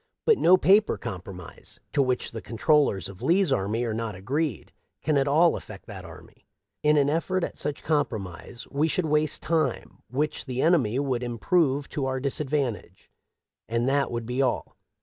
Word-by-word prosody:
" -, -, -61 dB
But 450 Hz, -3 st, +4 dB
no 180 Hz, +2 st, +6 dB
paper 200 Hz, +4 st, +4 dB
compromise, 95 Hz, -5 st, -8 dB
to 145 Hz, -, +3 dB
which 125 Hz, -2 st, 0 dB
the 115 Hz, -, -6 dB
con 115 Hz, -, -8 dB
trollers 145 Hz, -, +3 dB
of 100 Hz, -1 st, -11 dB
Lee's 175 Hz, -3 st, +3 dB
army 110 Hz, +2 st, 0 dB
are 115 Hz, -2 st, -1 dB
not 110 Hz, -2 st, -3 dB
agreed, 130 Hz, -, -2 dB, 0.3 s
can 155 Hz, -, +1 dB
at 140 Hz, 0 st, +2 dB
all 160 Hz, +4 st, +4 dB
affect -, -, -9 dB
that -, -, -9 dB
army. -, -, -14 dB, 0.3 s
In 150 Hz, 0 st, +4 dB
an 140 Hz, -1 st, +4 dB
effort 170 Hz, +4 st, 0 dB
at -, -, -4 dB
such 145 Hz, -1 st, -3 dB
compromise 115 Hz, -, -2 dB
we 145 Hz, +3 st, +1 dB
should 180 Hz, +2 st, 0 dB
waste 150 Hz, 0 st, +1 dB
time, 165 Hz, -1 st, -1 dB
which 145 Hz, +5 st, -2 dB
the 130 Hz, -1 st, -3 dB
enemy 135 Hz, -8 st, +3 dB
would 135 Hz, -3 st, 0 dB
im 120 Hz, -1 st, -4 dB
prove 145 Hz, -2 st, +2 dB
to 135 Hz, -3 st, -2 dB
our 130 Hz, 0 st, -1 dB
disadvantage; 135 Hz, -, -2 dB, 0.6 s
and 115 Hz, +2 st, 0 dB
that 140 Hz, +1 st, +2 dB
would 120 Hz, -1 st, -4 dB
be 125 Hz, +3 st, -1 dB
all. 130 Hz, -3 st, -1 dB
135 Hz, 185 wpm, -26 LUFS, 115-155 Hz, 0.6 s, no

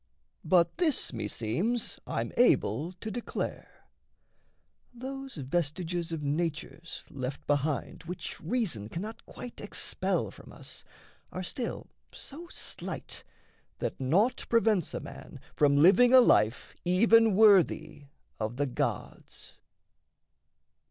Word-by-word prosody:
But 175 Hz, -, +3 dB
this 320 Hz, -6 st, +2 dB
meseems 120 Hz, -, -2 dB
I'm -, -, -2 dB
able 160 Hz, -, +3 dB
to 215 Hz, +4 st, -7 dB
declare: 240 Hz, +3 st, -5 dB, 1.1 s
Those 270 Hz, +2 st, -7 dB
vestiges 165 Hz, +4 st, -2 dB
of 160 Hz, -2 st, -3 dB
natures 160 Hz, +2 st, -3 dB
left 135 Hz, -1 st, -5 dB
behind 145 Hz, +2 st, -1 dB
Which 180 Hz, +1 st, -6 dB
reason 165 Hz, -, -1 dB
cannot 210 Hz, -, -6 dB
quite 245 Hz, -, -9 dB
expel -, -, -1 dB
from -, -, -14 dB
us -, -, -6 dB, 0.5 s
Are 185 Hz, -, -4 dB
still 235 Hz, +7 st, -4 dB, 0.3 s
so 330 Hz, +5 st, -7 dB
slight -, -, -6 dB, 0.5 s
that -, -, -3 dB
naught 195 Hz, -, +2 dB
prevents 220 Hz, -7 st, +2 dB
a -, -, -2 dB
man -, -, -10 dB, 0.2 s
From 140 Hz, -1 st, +4 dB
living 240 Hz, -, +7 dB
a -, -, +11 dB
life 130 Hz, -, +3 dB
even 220 Hz, +4 st, +5 dB
worthy 195 Hz, -8 st, +4 dB, 0.3 s
of 110 Hz, +2 st, -3 dB
the 145 Hz, -, +1 dB
gods. 130 Hz, -, -4 dB
175 Hz, 110 wpm, -29 LUFS, 145-230 Hz, 1.1 s, a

